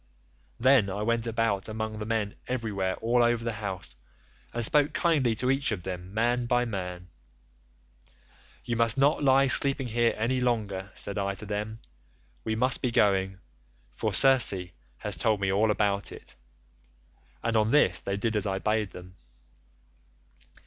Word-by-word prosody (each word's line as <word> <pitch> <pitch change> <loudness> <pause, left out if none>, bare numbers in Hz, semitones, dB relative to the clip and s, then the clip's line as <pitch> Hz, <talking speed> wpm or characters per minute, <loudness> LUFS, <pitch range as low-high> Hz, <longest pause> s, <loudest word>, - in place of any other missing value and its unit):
Then 130 -6 +4
I 100 +2 -3
went 115 +1 0
about 115 -3 -1
among 110 0 -5
the 105 - -5
men 110 -3 -1
everywhere 105 -7 -2
all 120 +2 +2
over 120 -1 +1
the 115 - -2
house, 95 - -5 0.6
and 120 -1 +1
spoke 150 +3 +3
kindly 150 -7 +1
to 125 +4 0
each 135 -1 0
of 95 -5 -3
them 90 0 -6
man 120 +3 0
by 125 0 +1
man: 90 -5 -6 1.6
'You 120 -1 -2
must 115 +2 +2
not 145 +2 +2
lie 135 0 +4
sleeping 135 -1 +3
here 115 +1 +1
any 120 +4 0
longer,' 105 -6 -2
said 100 0 -2
I 100 0 -2
to 105 - -8
them, 105 +2 -5 0.6
'we 110 -1 -2
must 125 +3 +1
be 125 - 0
going, 95 -5 +1 0.5
for - - -3
Circe 105 -9 +5 0.3
has - - -3
told 110 -2 +1
me 100 -1 0
all 105 +3 +2
about 100 -2 0
it.' - - -10 1.1
And 115 -1 -1
on 110 0 +2
this 150 +4 +3
they 100 0 -3
did 110 +2 -2
as 105 -1 0
I 95 -1 -1
bade 105 0 -1
them. 90 +1 -12
110 Hz, 160 wpm, -27 LUFS, 100-120 Hz, 1.6 s, Circe